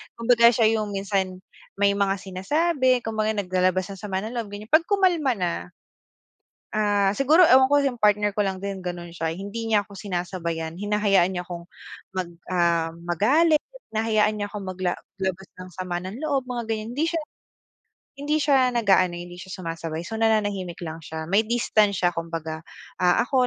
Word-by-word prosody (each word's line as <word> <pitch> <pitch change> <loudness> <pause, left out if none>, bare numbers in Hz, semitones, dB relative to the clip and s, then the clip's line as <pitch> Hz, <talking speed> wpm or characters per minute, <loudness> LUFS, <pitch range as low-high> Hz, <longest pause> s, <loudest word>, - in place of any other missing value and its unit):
Kumbaga 235 0 +5
siya 225 -1 +3
yung 210 -1 -3
minsan 195 -2 -1 0.4
may 200 0 +4
mga 195 -1 +2
sinasabi. 255 - +1
Kumbaga 220 -1 0
naglalabas 185 -1 +1
ng 195 - -8
sama 190 -2 -2
ng 225 - -5
loob, 220 -3 -3
ganyan. 210 +3 -8
'Pag 320 +2 +5
kumalma 355 -9 +3
na, 180 -2 0 1.2
ah, 205 -2 +2
siguro 305 - +5
ewan 260 -1 +7
ko - - +6
yung 250 -4 -1
partner 210 0 +3
ko - - -3
lang 190 -1 -3
din 200 -1 -4
ganon 175 -1 -5
siya, 165 -1 -2
hindi 205 +4 -5
niya 210 -2 +3
ako 200 -2 -14
sinasabayan, 175 -4 -3
hinahayaan 205 -3 +2
niya 180 - -2
akong 170 -1 -7 0.5
mag 185 -2 -2 0.2
um, 170 -2 +2 0.2
magalit. 295 - +3 0.3
Hinahayaan 215 -1 +2
niya 205 - -2
akong 205 -2 -6
magla 185 -1 -2 0.3
labas 190 0 -2
ng 185 0 -8
sama 180 -2 -3
ng 200 +8 -7
loob, 275 -4 0
mga 240 -2 -3
ganyan. 220 +1 -3
Hindi 315 +3 +1
siya 330 - 0 1.0
hindi 290 +2 0
siya 265 -3 +4
nag-aano, 195 -6 +3
hindi 175 0 -9
siya 190 - -10
sumasabay. 165 -1 -4
So 220 +4 -5
nananahimik 205 -6 0
lang 160 0 -6
siya. 160 +1 -6
May 200 +3 +4
distance 215 -5 +2
siya 175 - +5
kumbaga. 165 -1 -4 0.4
Ah, 180 -1 +4
ako, 255 -1 +2
200 Hz, 170 wpm, -24 LUFS, 180-230 Hz, 1.2 s, ewan